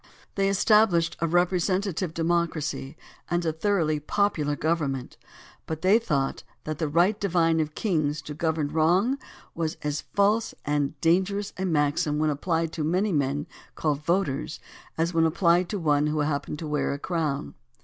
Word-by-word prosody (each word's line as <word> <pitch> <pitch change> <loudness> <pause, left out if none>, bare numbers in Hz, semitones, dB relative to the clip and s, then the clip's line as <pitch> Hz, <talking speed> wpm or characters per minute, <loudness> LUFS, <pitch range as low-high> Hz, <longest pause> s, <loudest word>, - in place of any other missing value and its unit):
They 195 0 +1
established 195 -4 +3
a 165 - +1
represent 180 +2 +2
ative 185 -3 -2
democracy 165 -3 -1 0.3
and 175 0 0
a 160 - 0
thoroughly 160 -3 +1
popular 155 -4 0
govern 155 -2 0
ment, 130 -2 -7 0.5
but 160 +1 -5
they 200 +5 +5
thought 140 -12 -1 0.2
that 155 -1 -5
the 160 - 0
"right 175 +8 +2
divine 165 -4 +2
of 155 -1 -2
kings 155 -7 0
to 150 - -7
govern 155 -1 -1
wrong" 180 - +2 0.3
was 160 -2 -2
as 150 0 -1
false 210 +3 +1
and 145 0 -1
dangerous 190 +4 +1
a 190 - -3
maxim 150 -2 +1
when 155 0 +2
applied 165 +2 -1
to 160 - -3
many 185 +7 +1
men 145 -2 0 0.3
called 150 -2 -1
voters 155 -4 -1 0.4
as 165 +2 0
when 165 0 +4
applied 170 +2 +2
to 210 - -2
one 150 -4 +2
who 150 0 0
happened 145 0 -2
to 155 - -6
wear 150 -1 0
a - - -3
crown. 150 -3 -2
165 Hz, 165 wpm, -26 LUFS, 150-180 Hz, 0.5 s, they